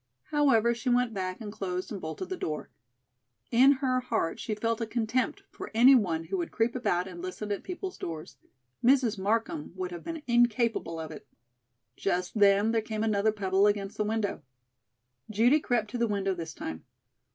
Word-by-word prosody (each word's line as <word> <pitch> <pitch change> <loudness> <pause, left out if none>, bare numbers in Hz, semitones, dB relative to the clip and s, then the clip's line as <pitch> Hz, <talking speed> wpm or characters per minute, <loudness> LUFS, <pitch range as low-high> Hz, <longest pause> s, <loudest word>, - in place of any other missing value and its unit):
However, 235 -6 +4
she 235 +2 -3
went 245 -1 +2
back, 185 -2 -3
and 210 -2 -6
closed 185 -3 -4
and 200 -3 -5
bolted 160 - -5
the 375 - -2
door. 155 - -4 0.8
In 260 +4 +7
her 260 -2 0
heart 225 -9 -1
she 215 - -3
felt 230 +2 -1
a 225 - -1
contempt 235 +2 -1
for - - -8
any 250 +4 +8
one 175 -10 +2
who 185 +4 -3
would 170 - -2
creep 230 +2 0
about 180 -7 0
and 175 -2 -8
listen 185 +3 -5
at 200 - -2
people's 370 +1 -6
doors. 160 -2 -6 0.5
Mrs. 245 -4 +3
Markham 225 - -1
would 185 -1 -4
have 175 -1 -7
been 325 -2 -6
incapable 235 -7 +2
of 160 -1 -6
it. 155 - -10 0.7
Just 180 +2 -1
then 200 +2 +5
there 225 -1 +2
came 220 0 -3
another 215 -1 +2
pebble 195 -1 +2
against 205 -1 -1
the 210 - +1
window. 215 -1 -1 0.9
Judy 235 +8 +4
crept 235 -7 -1
to 245 - -3
the 235 - +2
window 195 -2 0
this 165 -2 -6
time. 80 0 -6
215 Hz, 185 wpm, -29 LUFS, 190-240 Hz, 0.9 s, any